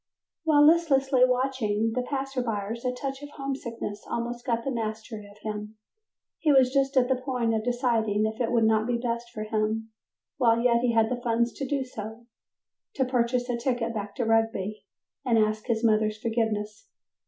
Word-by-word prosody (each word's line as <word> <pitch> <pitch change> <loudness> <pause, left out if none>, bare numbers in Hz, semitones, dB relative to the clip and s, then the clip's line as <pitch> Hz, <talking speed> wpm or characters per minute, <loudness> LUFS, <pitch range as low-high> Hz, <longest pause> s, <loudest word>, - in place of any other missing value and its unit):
While 295 -2 +6
listlessly 275 -5 +4
watching 250 -4 0
the 250 - 0
passersby 250 -4 -2
a - - 0
touch 270 +2 -5
of 290 - -8
homesickness 235 -6 -5
almost 240 +1 -3
got 230 -1 0
the 270 - -2
mastery 220 -2 -5
of 205 - -17
him. 210 0 -5 0.6
He 310 - +3
was 260 -2 +5
just 275 -1 +1
at 250 -1 +5
the 260 0 +1
point 250 -3 0
of 220 -1 0
deciding 230 -4 +1
if 220 +3 -3
it 235 - 0
would 235 -2 +3
not 220 0 +3
be 245 -1 +1
best 235 0 -3
for 215 -2 -6
him 220 +1 -1 0.5
while 235 -3 +4
yet 235 -1 +3
he 245 -1 +1
had 225 0 +3
the 245 -1 -2
funds 235 0 +1
to 275 - -4
do 275 0 0
so, 220 -1 -8 0.7
to 265 - +1
purchase 245 0 0
a 245 -2 -1
ticket 235 -1 -1
back 205 -2 -5
to 240 - -1
Rugby 225 -2 0 0.4
and 240 -4 +2
ask 215 +1 +1
his 230 -1 0
mother's 215 -1 +2
forgiveness. 220 -2 -2
235 Hz, 180 wpm, -27 LUFS, 220-255 Hz, 0.7 s, While